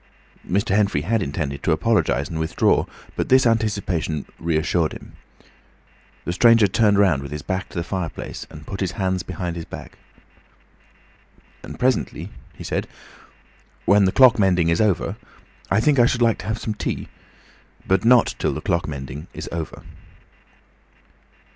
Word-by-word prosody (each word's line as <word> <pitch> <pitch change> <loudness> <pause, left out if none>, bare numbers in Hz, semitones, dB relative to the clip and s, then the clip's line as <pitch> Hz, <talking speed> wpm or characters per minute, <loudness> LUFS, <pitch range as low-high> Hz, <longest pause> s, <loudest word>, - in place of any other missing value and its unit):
Mr. 100 +1 0
Henfrey 100 -8 +2
had 110 +6 0
intended 70 -3 -3
to - - 0
apologise 80 -5 +1
and 80 - -5
withdraw, 80 0 +2 0.3
but - - -2
this 130 0 +5
anticipation 100 - 0
reassured 80 0 0
him. - - -11 1.1
The 85 - -2
stranger 115 +2 +6
turned 100 +1 +3
round 95 -9 +3
with 70 - -8
his 75 -1 -5
back 95 0 -3
to - - -9
the 85 - -1
fireplace 85 -1 -5
and 75 -1 -12
put 100 - -6
his 95 -2 -1
hands 95 -2 -1
behind 90 0 -5
his 85 -1 -6
back. - - -10 1.6
"And - - -9
presently," 125 -1 -1 0.2
he - - -9
said, - - -2 1.0
"when 100 -1 +5
the 95 - +2
clock 125 -1 +6
mending 90 -4 +3
is 85 +3 +2
over, 105 -5 0 0.5
I 95 - +3
think 140 +4 +3
I 120 - +6
should 125 - 0
like 115 -2 +2
to 90 - -8
have 110 +1 -1
some 110 - -3
tea. - - -4 0.8
But 95 -1 +2
not 120 +1 +5
till - - 0
the - - -3
clock 85 -1 -1
mending 70 +2 -7
is - - -6
over." 80 -1 -5
95 Hz, 160 wpm, -22 LUFS, 80-110 Hz, 1.6 s, stranger